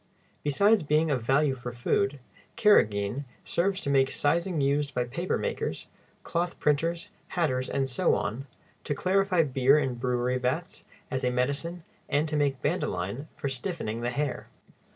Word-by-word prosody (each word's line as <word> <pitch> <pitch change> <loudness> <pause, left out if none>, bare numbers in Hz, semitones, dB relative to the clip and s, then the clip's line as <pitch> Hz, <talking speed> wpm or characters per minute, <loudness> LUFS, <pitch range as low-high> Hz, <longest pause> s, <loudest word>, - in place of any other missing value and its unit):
Besides 200 +9 +4
being 155 +1 +2
of 130 -4 0
value 135 +4 +2
for 125 -1 -6
food, 135 +3 0 0.4
carrageen 115 - +3 0.2
serves 190 +2 0
to - - -3
make 135 -1 +4
sizing 170 +4 +1
used 140 0 +1
by 125 - +2
paper 170 +10 -2
makers, - - -3 0.4
cloth 175 +1 -2
printers, 165 +3 0 0.3
hatters, 130 -7 +1
and 135 -1 0
so 125 - +2
on, 120 +7 -3 0.4
to 145 - -2
clarify 185 0 +2
beer 135 0 +4
in 140 -3 +1
the - - -4
brewery 125 +1 0
vats, 150 +9 -3 0.3
as 130 -1 -2
a 125 - +3
medicine, 140 +7 -1 0.3
and 150 +2 +2
to 155 - -2
make 140 -3 0
bandoline 130 - -2
for 140 - -3
stiffening 130 - -3
the 120 - 0
hair. 140 +2 -2
140 Hz, 155 wpm, -28 LUFS, 125-165 Hz, 0.4 s, Besides